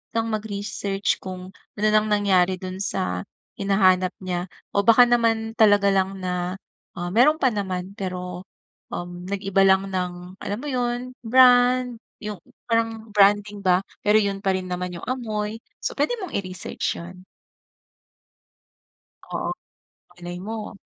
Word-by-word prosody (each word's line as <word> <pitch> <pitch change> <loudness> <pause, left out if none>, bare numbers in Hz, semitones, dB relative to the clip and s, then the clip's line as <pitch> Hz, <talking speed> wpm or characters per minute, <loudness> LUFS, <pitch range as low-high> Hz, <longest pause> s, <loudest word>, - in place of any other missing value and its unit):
ng 225 0 +1
mag-research 205 -2 -2
kung 185 0 -7 0.3
ano 210 - -3
ang 215 0 +3
nangyari 190 -3 +3
dun 185 0 -6
sa 90 - -2 0.4
hinahanap 185 -2 +3
niya 180 0 -2 0.3
o 200 - +3
baka 230 +2 +8
naman 225 -2 +2
talaga 205 -2 +5
lang 195 0 +1
na 180 0 -2 0.4
ah, 175 0 -3
meron 275 +9 +5
pa 260 - +4
naman 190 -3 -3
pero 180 -2 -5 0.5
um, 175 0 -6
nag-iba 195 0 +1
lang 190 0 +4
ng 180 -1 -1 0.3
alam 205 +1 -3
mo 295 - -6
yun, 245 -1 -2 0.2
brand, 250 0 +5 0.2
yung 210 -3 -6 0.3
parang 225 -1 0
branding 205 0 +4
ba 180 -1 +4 0.2
pero 210 +1 +5
yun 200 -2 -1
pa 195 - +2
rin 185 -1 -4
naman 180 0 -3
yung - - -9
amoy 220 -4 -3 0.2
so - - -3
pwede 485 - +1
mong 365 - -5
i-research 185 -3 -3
yun. 180 +2 -10 2.0
Oo, - - -3 0.6
malaymo. 180 +5 -7
200 Hz, 135 wpm, -24 LUFS, 185-225 Hz, 2.0 s, baka